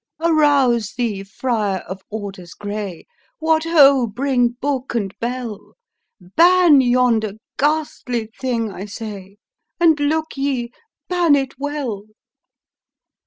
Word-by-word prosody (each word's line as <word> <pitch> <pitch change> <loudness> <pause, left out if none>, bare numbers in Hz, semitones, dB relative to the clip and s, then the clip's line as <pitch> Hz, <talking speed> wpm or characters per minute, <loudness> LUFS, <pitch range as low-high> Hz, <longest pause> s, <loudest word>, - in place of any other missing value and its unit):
" - - -66
"Arouse 285 -9 +3
thee, 225 -6 -1
friar 205 -2 -2
of 190 +1 -8
orders 195 -5 -7
grey; 205 -4 -6 0.3
What 320 0 +1
ho! 280 -6 +5
bring 245 +2 +1
book 270 -3 -2
and 200 -4 -2
bell! 235 -3 -5 0.5
Ban 330 - +5
yonder 245 -4 +2 0.3
ghastly 270 -6 -1
thing, 235 -4 -1
I 195 +1 -7
say; 200 -2 -8 0.4
And, 325 -3 +4
look 315 +2 -1
ye, 265 -4 -1 0.4
ban 350 -4 +3
it 270 -2 -1
well! 275 -8 -4
245 Hz, 115 wpm, -20 LUFS, 210-290 Hz, 0.5 s, ho